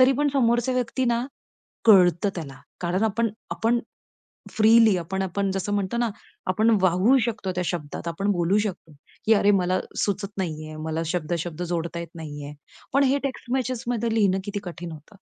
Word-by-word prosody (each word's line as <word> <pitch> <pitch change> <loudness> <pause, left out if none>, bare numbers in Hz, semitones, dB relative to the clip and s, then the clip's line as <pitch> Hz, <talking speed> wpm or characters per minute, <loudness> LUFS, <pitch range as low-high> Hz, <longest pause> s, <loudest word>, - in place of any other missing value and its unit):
तरी 255 +1 +7
पण 295 0 +3
समोरच्या 240 0 +2
व्यक्ती 255 +1 0
ना, 235 +1 +1 0.6
कळतं 185 -3 +6
त्याला. 140 -6 -6 0.2
कारण 180 +3 0
आपण 225 +2 +1 0.2
आपण 235 +1 +1 0.7
फ्रीली 220 -2 +5
आपण 190 +3 -3
आपण 195 +1 -1
जसं 195 +2 -2
म्हणतो 200 +3 -1
ना, 235 -1 +2 0.4
आपण 215 +5 +3
वाहू 185 +8 +4
शकतो 215 -5 -3
त्या 180 - +1
शब्दात, 170 -1 -4
आपण 195 +5 -1
बोलू 180 +2 +2
शकतो, 190 -6 -4 0.3
"की 220 - +5
अरे, 205 0 +4
मला 180 +1 +1 0.3
सुचत 200 0 -2
नाहीये, 155 -3 -4
मला 160 +1 -2
शब्द-शब्द 170 0 -2
जोडता 170 -1 -3
येत 170 - -6
नाहीये." 145 -2 -7 0.4
पण 280 - +5
हे 275 +1 +3
टेक्स्ट 260 -2 -4
मेसेजमध्ये 240 -3 -1
लिहिणं 195 -4 +3
किती 205 0 -3
कठीण 175 -1 -7
होतं. 160 +7 -13
195 Hz, 165 wpm, -25 LUFS, 170-230 Hz, 0.7 s, तरी